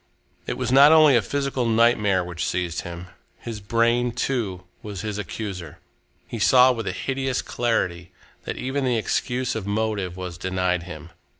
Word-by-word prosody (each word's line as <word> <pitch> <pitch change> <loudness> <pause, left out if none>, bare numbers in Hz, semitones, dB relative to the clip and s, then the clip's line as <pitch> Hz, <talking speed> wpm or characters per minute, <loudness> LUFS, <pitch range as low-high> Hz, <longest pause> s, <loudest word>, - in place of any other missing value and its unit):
It - - -3
was - - -2
not 140 +3 +8
only 155 -4 +7
a 120 - +4
physical 135 +1 -2
nightmare 110 -5 +3
which 90 -1 -5
seized 90 -2 -2
him. 85 +1 -8 0.3
His 115 -2 -7
brain, 115 +4 +1
too, 115 -8 -2 0.2
was 100 -3 -6
his 105 -1 -4
accuser. 95 -5 -6 0.5
He 115 - -6
saw 125 +4 +6
with 115 -3 -4
a - - 0
hideous 135 -1 -2
clarity 90 -8 -1 0.3
that - - -4
even 135 +2 -2
the 125 -2 +1
excuse 125 +3 -1
of 110 -3 -5
motive 100 -4 -2
was 90 -2 -6
denied 90 -1 0
him. 85 0 -9
110 Hz, 165 wpm, -23 LUFS, 90-125 Hz, 0.5 s, not